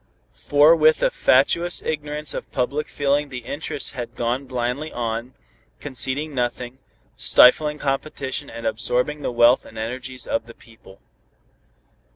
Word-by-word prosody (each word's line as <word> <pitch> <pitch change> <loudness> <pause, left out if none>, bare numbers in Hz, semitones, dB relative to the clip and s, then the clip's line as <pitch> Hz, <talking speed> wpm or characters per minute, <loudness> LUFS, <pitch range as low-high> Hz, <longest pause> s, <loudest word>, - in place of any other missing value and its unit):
For 145 +3 +4
with 155 -1 +3
a - - +3
fatuous 170 +7 +2
ignorance 150 -1 -3
of - - -7
public 140 +4 -2
feeling 145 0 -1
the 125 -3 -8
interests 145 -1 0
had 120 -1 -7
gone 120 +3 -2
blindly 125 +4 -3
on, 115 +1 -4 0.4
conceding 145 +2 -2
nothing, 125 0 -3 0.4
stifling 150 +4 +5
competition 140 0 -3
and 115 - -9
absorbing 125 +6 0
the - - -3
wealth 120 +1 +4
and 110 - -14
energies 125 +3 -5
of 115 0 -3
the 115 - -13
people. 110 -4 -19
130 Hz, 135 wpm, -22 LUFS, 120-150 Hz, 0.4 s, stifling